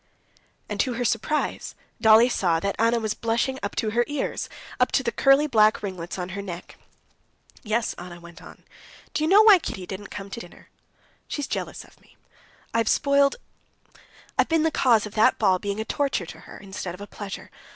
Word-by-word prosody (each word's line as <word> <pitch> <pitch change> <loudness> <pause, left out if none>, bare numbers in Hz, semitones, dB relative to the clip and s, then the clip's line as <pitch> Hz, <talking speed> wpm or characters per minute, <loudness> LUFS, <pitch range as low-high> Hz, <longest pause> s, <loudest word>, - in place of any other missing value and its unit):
And - - -5
to 255 - +1
her 245 +1 -2
surprise 295 +8 -1 0.3
Dolly 220 +1 +7
saw 175 -9 +1
that 200 +4 -2
Anna 230 +1 +3
was 220 -2 -1
blushing 235 +4 -1
up 205 - -4
to 215 - -1
her 240 +2 +2
ears, 290 -2 -3 0.3
up - - +3
to - - +2
the - - 0
curly 275 +2 +4
black 215 -7 +3
ringlets 185 -3 -5
on 180 0 -4
her 200 +2 -5
neck. 180 -2 -8 0.9
"Yes," 225 +1 -1
Anna 175 0 -9
went 170 0 -13
on. - - -14 0.5
"Do 305 - 0
you - - +2
know 410 +3 +7
why 420 -4 +8
Kitty 190 - -6
didn't 195 +2 -7
come 200 -1 -8
to 215 - -5
dinner? - - -13 0.6
She's 290 - -3
jealous - - -4
of - - -22
me. - - -25 0.6
I 230 - +2
have 225 - +1
spoiled... 280 0 +3 1.0
I've - - +3
been 325 -1 +2
the 320 - +2
cause 235 -7 +3
of 210 - -9
that 220 0 +4
ball 190 -4 +3
being 200 +2 -3
a 220 - -2
torture 275 -8 -1
to 160 - -11
her - - -10
instead 190 -3 -6
of 190 - -14
a - - -6
pleasure. 205 -1 -8
220 Hz, 200 wpm, -25 LUFS, 195-265 Hz, 1.0 s, why